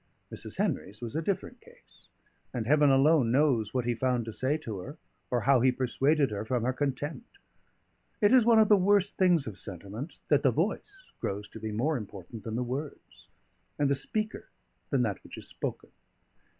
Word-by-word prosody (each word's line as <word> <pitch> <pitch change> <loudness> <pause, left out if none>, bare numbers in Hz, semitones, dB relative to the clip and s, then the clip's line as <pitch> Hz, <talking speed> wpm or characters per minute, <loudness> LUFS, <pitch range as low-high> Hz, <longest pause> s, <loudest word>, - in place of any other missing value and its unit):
Mrs. - - -9
Henry's 105 +2 -2
was 120 +1 -6
a 160 - 0
different 190 +2 -3
case; - - -21 0.5
and 115 -3 -2
Heaven 145 +3 +4
alone 135 -2 +4
knows 125 -6 +2
what 125 -2 -1
he 120 - +1
found 125 0 0
to 115 - -6
say 135 +6 0
to 110 -10 -6
her, 140 - -8 0.3
or 120 -1 0
how 130 +2 +4
he 130 +1 +5
persuaded 135 +2 +1
her 105 0 -3
from 120 +1 -1
her 130 +2 +1
contempt. 145 - -4 0.8
It 205 +3 +4
is 255 -2 +7
one 230 0 +5
of 220 -1 +6
the 210 - +7
worst 200 +1 +2
things 175 -6 +4
of 100 -4 -7
sentiment, 100 - -7
that 145 -2 +4
the 135 - +4
voice 220 - -2 0.2
grows 105 +1 -3
to - - -10
be 110 - -4
more 135 +8 0
important 105 0 -9
than 110 -1 -4
the 125 - 0
words, 135 +5 -7 0.5
and 145 -1 +2
the - - +5
speaker 215 +10 -3 0.4
than - - +2
that - - -3
which - - -11
is - - -9
spoken. - - -5
135 Hz, 190 wpm, -29 LUFS, 115-155 Hz, 0.8 s, is